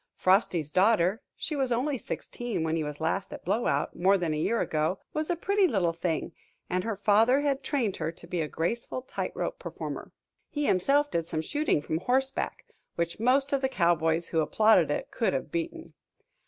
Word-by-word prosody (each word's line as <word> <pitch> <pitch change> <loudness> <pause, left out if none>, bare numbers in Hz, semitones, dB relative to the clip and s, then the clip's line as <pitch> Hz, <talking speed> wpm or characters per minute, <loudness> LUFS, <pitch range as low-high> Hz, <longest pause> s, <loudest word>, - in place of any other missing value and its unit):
Frosty's 185 -5 +2
daughter 195 - +3
she 310 - -4
was 265 -3 0
only 265 +5 +1
sixteen 240 -7 -4
when 160 0 0
he 160 - 0
was 150 -1 -5
last 175 +4 -1
at - - -9
Blowout, 210 +7 0
more 195 +3 +4
than 170 -4 -1
a 150 - -2
year 230 +8 +1
ago 155 +4 0 0.2
was 310 0 -2
a 350 - +2
pretty 395 +3 +2
little 185 - +1
thing, 170 0 -2 0.4
and 180 0 0
her 225 -2 -2
father 220 +7 +4
had 280 -2 0
trained 240 -10 -1
her 160 0 -2
to 170 - -14
be 175 0 -2
a 155 - -1
graceful 230 +11 -3
tight - - -4
rope - - -3
performer. - - -6 0.4
He 295 -1 -2
himself 280 +10 +3
did 165 -1 -1
some 160 -1 -2
shooting 295 - 0
from 160 +2 -1
horseback, 265 +6 -1 0.3
which 170 +2 -2
most 270 +4 +3
of 275 - +2
the 265 - +1
cowboys 170 -4 +1
who 160 - +2
applauded 215 +7 +4
it - - -2
could - - 0
have - - -3
beaten. 335 -1 -4
200 Hz, 195 wpm, -28 LUFS, 170-270 Hz, 0.4 s, more